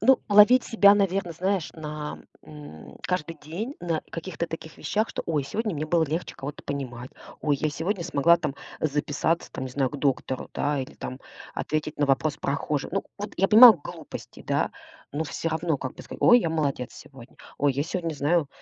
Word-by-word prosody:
Ну, 265 0 +5
ловить 210 +5 +7
себя, 200 -3 +6
наверно, 195 -3 0
знаешь, 185 +1 -1
на, 150 -1 -6 0.2
м, 145 - -11
каждый 165 -3 -2
день 205 - -5
на 165 -3 -1
каких-то 170 0 -4
таких 160 -1 -8
вещах, 215 +2 0
что: - - -4
"Ой, 150 -4 0
сегодня 210 - -2
мне 150 +1 -3
было 165 0 +3
легче 160 +4 -4
кого-то 140 +2 -7
понимать. 130 -3 -5 0.3
Ой, 145 -2 +1
я 155 - 0
сегодня 170 +4 -2
смогла 170 +1 +4
там 145 -4 -3 0.3
записаться, 150 +2 0
там, 130 - -5
не 130 - -6
знаю, 130 0 0
к - - -6
доктору, 130 -2 -1
да, 145 -1 0
или 130 - -5
там 130 - -7 0.3
ответить 155 0 -3
на 145 - +2
вопрос 145 +2 +1
прохожих". 140 +2 -2
Ну 195 - 0 0.2
вот, 205 - -5
я 195 - +2
понимаю, 225 +1 +11
глупости, 145 - -9
да. - - +1 0.4
Но 155 +3 -2
всё 165 - -3
равно, 160 -1 0
как 130 - -5
бы - - -10
сказать: - - -9
"Ой, 245 - +8
я 170 - 0
молодец 140 -6 -1
сегодня. 130 -3 -14 0.2
Ой, 145 0 +2
я 140 +2 -1
сегодня 165 0 -3
знаю 145 +2 +1
155 Hz, 190 wpm, -26 LUFS, 145-180 Hz, 0.4 s, понимаю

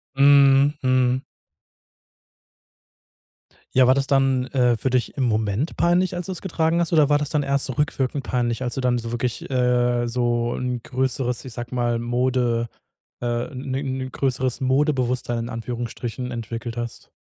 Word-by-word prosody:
Mhm. 140 0 +6
Mhm. 130 0 +2 2.5
Ja, 130 -1 +6
war 130 - +6
das 135 0 0
dann, 135 -2 +2
äh, 125 -4 +2
für 130 - -1
dich 125 +2 0
im 135 - 0
Moment 110 +5 -1
peinlich, 180 +2 +2
als 175 - -4
du 190 - -4
es 180 - -6
getragen 165 -2 0
hast? 170 - 0
Oder 155 -4 +5
war 145 0 +3
das 150 - -3
dann 150 -2 0
erst 140 0 0
so 130 - -3
rückwirkend 140 -1 -1
peinlich, 120 0 -1
als 120 -1 -2
du 135 - -2
dann 125 -1 +2
so 115 -1 -5
wirklich, 120 0 -3
äh, 125 -1 +2
so 120 0 0
'n 125 -2 -3
größeres, 130 -1 -2
ich 125 - -8
sage 120 +1 -6
mal, 120 -1 0
Mode, 120 -1 0 0.5
äh 120 +2 -2
'ne 130 +1 -4
'ne 130 -1 -3
größeres 130 -1 -1
Modebewusstsein 130 -3 +1
in 115 +1 -4
Anführungsstrichen 120 +1 -5
entwickelt 115 0 -5
hast? 120 0 -6
125 Hz, 165 wpm, -23 LUFS, 120-135 Hz, 2.5 s, Mhm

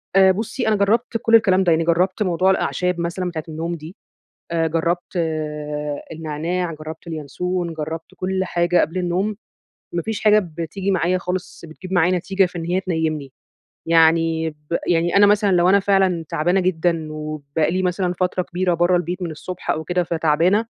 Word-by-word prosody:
آآ 190 -1 +7
بُصي 220 +3 -3
أنا 220 - +3
جربت 230 +4 +1
كل 230 -1 +4
الكلام 190 -4 +4
ده، 175 - +3
يعني 165 +1 +3
جربت 180 +5 +1
موضوع 185 0 +2
الأعشاب 180 -2 0
مثلًا 175 +2 -2
بتاعة 160 -3 -5
النوم 165 +2 -3
دي، 160 +3 -10 0.6
آآ 165 -1 +1
جربت 170 +3 -1 1.0
النعناع، 165 +3 -3
جربت 155 +2 -9
اليانسون، 170 +3 -3
جربت 160 +4 -6
كل 190 +1 -2
حاجة 175 0 +2
قبل 165 +5 -1
النوم، 185 +4 -1 0.6
ما 170 - 0
فيش 220 +3 -4
حاجة 215 0 +6
بتيجي 180 +2 -4
معايا 180 0 +1
خالص 180 -1 -5
بتجيب 185 +4 -9
معايا 180 +1 +3
نتيجة 190 +2 +1
في 180 0 -7
إن 165 - -4
هي 180 +2 +1
تنيمني. 160 -6 -2 0.5
يعني 165 0 +3
ب 150 +2 -6
يعني 175 +1 +2
أنا 205 - +7
مثلًا 205 0 +3
لو 175 0 +4
أنا 200 +1 +5
فعلًا 190 -4 +2
تعبانة 175 +3 +1
جدًا 170 -3 0
وبقى 155 0 -2
لي 185 +1 0
مثلًا 180 0 0
فترة 185 0 -1
كبيرة 180 0 -1
برّه 175 +2 +3
البيت 180 +1 -2
من 170 -2 -3
الصبح 180 +4 -8
أو 160 - -2
كده 180 +2 0
فتعبانة، 170 +6 +2
175 Hz, 175 wpm, -21 LUFS, 165-185 Hz, 1.0 s, آآ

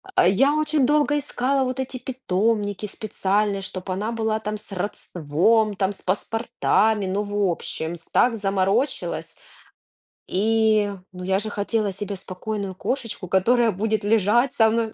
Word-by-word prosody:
А, 175 - +5
я 270 +10 +4
очень 305 -3 +2
долго 295 0 +3
искала 270 -1 0
вот 255 +1 -3
эти 260 0 -3
питомники 210 -4 -1
специальные, 200 -1 -1
чтобы 185 0 -5
она 210 +5 -2
была 220 -1 -1
там 215 0 -4
с 210 0 -11
родством, 195 +3 +1
там 195 0 0
с - - -9
паспортами. 220 +1 +1
Ну 195 +2 0
в 205 -2 0
общем, 165 0 -5
с 165 - -15
так 235 -2 +3
заморочилась. 195 +6 -1 0.9
И, 215 0 +2 0.2
ну, 180 0 -8
я 190 +1 +1
же 215 +1 -4
хотела 205 0 -1
себе 200 +1 -4
спокойную 195 +1 -5
кошечку, 230 -5 -3
которая 225 +5 +3
будет 215 +2 -1
лежать 225 +5 +3
со 225 -5 +5
мной 225 -1 0
210 Hz, 150 wpm, -23 LUFS, 195-230 Hz, 0.9 s, А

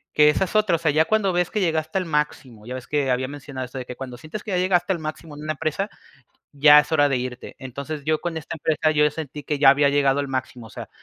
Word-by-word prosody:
que 150 0 +6
esa 150 - +2
es 190 - -5
otra, 215 -5 +3
o - - +1
sea, 160 -2 +1
ya 155 +2 +3
cuando 210 -2 +1
ves 175 0 +1
que 215 - -2
llegaste 160 -2 0
al 185 - -1
máximo, 145 -8 -3
ya 125 - -5
ves 130 - -7
que 145 -3 -1
había 130 +1 0
mencionado 140 -2 -7
eso 130 +1 -8
de 125 - -6
que, 125 - -7
"cuando 130 -1 -7
sientes 160 - -8
que 215 - -6
ya 185 - +1
llegaste 180 0 +2
al 170 - -4
máximo 155 0 -7
en 145 - -10
una 155 +1 -2
empresa, 160 +7 -2 0.6
ya 150 +1 +7
es 150 +1 -7
hora 145 -3 +4
de 135 - +1
irte", 125 0 -6
entonces, 140 +4 -6
yo, 155 0 +1
con 170 -2 -4
esta 160 +1 -6
empresa, 155 0 +1
yo 150 -1 +3
sentí 150 -2 -7
que 150 -2 -2
ya 135 -2 +8
había 140 +1 +4
llegado 140 -1 +2
al 145 - -1
máximo, 130 -3 -4
o - - -14
sea, - - -8
150 Hz, 280 wpm, -23 LUFS, 135-160 Hz, 0.6 s, ya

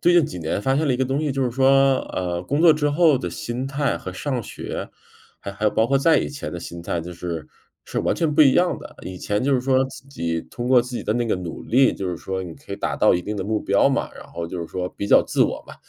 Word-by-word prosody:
最 175 - +4
近 170 -4 +6
几 150 - -6
年 80 +4 -2
发 135 +3 +2
现 155 +2 +1
了 135 - +2
一 - - -1
个 130 - +1
东 135 +3 -1
西， 155 -2 -1
就 135 0 -1
是 125 - 0
说， 135 +1 +4 0.2
呃， 90 -1 -2
工 145 - -1
作 170 -2 +8
之 150 -1 0
后 155 -2 +4
的 90 - -3
心 120 +8 -4
态 135 +1 -1
和 95 - -7
上 125 +4 -3
学， - - -6 0.5
还 100 - -6
还 105 +2 -5
有 105 - +4
包 110 - +2
括 135 +3 +2
再 155 +2 +4
以 - - -2
前 145 0 -6
的 90 - -4
心 85 0 -8
态 85 0 -2
就 85 +2 -7
是， 85 -2 -5 0.4
是 - - -4
完 - - +1
全 165 -3 0
不 150 - +3
一 135 - +6
样 175 +4 +2
的。 - - -11
以 95 0 -7
前 105 +5 -1
就 140 +1 +2
是 125 - +2
说 130 0 +2
自 130 0 -12
己 85 -11 -2
通 120 0 -6
过 130 -1 +6
自 125 0 -6
己 - - -4
的 105 - 0
那 120 0 0
个 110 - +1
努 90 -2 -6
力， 130 +2 +4
就 95 - -4
是 90 - -3
说 95 +2 -4
你 85 -3 -8
可 - - -11
以 - - -3
达 - - -2
到 - - +4
一 90 - -1
定 105 +4 -4
的 95 - -2
目 110 +2 0
标 100 +6 +3
嘛， 135 - -1
然 - - -11
后 85 - -5
就 90 +2 -6
是 85 - -4
说 90 +2 -4
比 100 - -5
较 - - +6
自 - - +2
我 - - -2
嘛。 - - -10
125 Hz, 320 characters per minute, -22 LUFS, 90-135 Hz, 0.5 s, 作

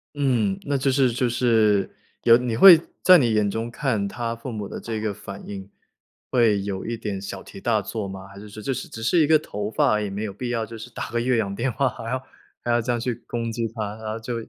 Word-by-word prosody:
嗯， 120 -9 +1
那 145 - -1
就 135 +1 +1
是 130 -2 +3
就 125 +1 0
是 110 -5 +3 0.4
有 115 - +7
你 120 -2 -2
会 175 +1 +10 0.2
在 185 -1 +9
你 120 -5 +2
眼 105 -1 +2
中 115 +3 -3
看 120 -6 -1
他 115 +3 -3
父 115 +2 -7
母 105 -3 -5
的 - - -7
这 115 -1 -4
个 110 -1 -2
反 100 -1 -9
应， 100 -1 -7 0.6
会 115 -5 +3
有 100 -1 -4
一 115 0 -3
点 105 -3 -4
小 95 -1 -7
题 95 - -12
大 115 -2 +2
做 105 +1 -4
吗？ 95 0 -8
还 100 0 -13
是 105 +1 -11
说 110 +1 -9
这 135 - -1
是 - - -5
只 115 - -8
是 170 +9 +3
一 150 - +3
个 155 0 +6
头 105 -8 -5
发 - - +2
而 105 0 +1
已 105 - -3
没 100 +2 -4
有 105 -3 -4
必 120 +5 -5
要 115 -2 -1
就 115 +1 -9
是 110 - -9
打 - - -6
个 120 - 0
越 125 0 +2
洋 100 -3 -1
电 120 +6 -1
话 135 +2 +1
还 115 - -7
要 130 +1 -1 0.4
还 120 - -1
要 120 0 +3
这 120 +2 -1
样 120 - 0
去 125 +1 -1
攻 115 -1 -3
击 115 0 -2
他， 105 -2 -5
然 110 -1 -5
后 110 - -4
就 120 +2 -4
115 Hz, 285 characters per minute, -24 LUFS, 105-120 Hz, 0.6 s, 会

